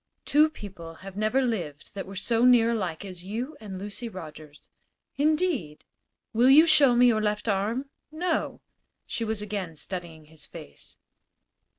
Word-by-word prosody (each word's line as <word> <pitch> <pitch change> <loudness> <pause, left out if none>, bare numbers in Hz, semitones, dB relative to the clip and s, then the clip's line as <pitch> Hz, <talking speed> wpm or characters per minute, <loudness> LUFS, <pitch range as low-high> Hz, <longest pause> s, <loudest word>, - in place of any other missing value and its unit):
"Two 305 +2 +5
people 175 - -10
have 195 -1 -8
never 215 +6 +1
lived 170 - -3
that 195 -2 -6
were 195 - -9
so 225 +4 +1
near 240 -2 +6
alike 190 -6 -3
as 180 -2 -8
you 235 +10 -4
and 200 -3 -7
Lucy 205 +5 -6
Rogers." 155 -6 -11 0.5
"Indeed?" 295 - 0 0.5
"Will 240 +3 +5
you 300 +4 +8
show 295 -6 +6
me 245 +1 +6
your 225 -3 +4
left 210 +1 -1
arm?" 225 +7 -1 0.2
"No." 330 +1 -2 0.4
She 230 - -3
was 220 -2 -3
again 200 -6 -4
studying 165 -2 -6
his 155 0 -11
face. 70 - -10
210 Hz, 155 wpm, -27 LUFS, 180-250 Hz, 0.5 s, you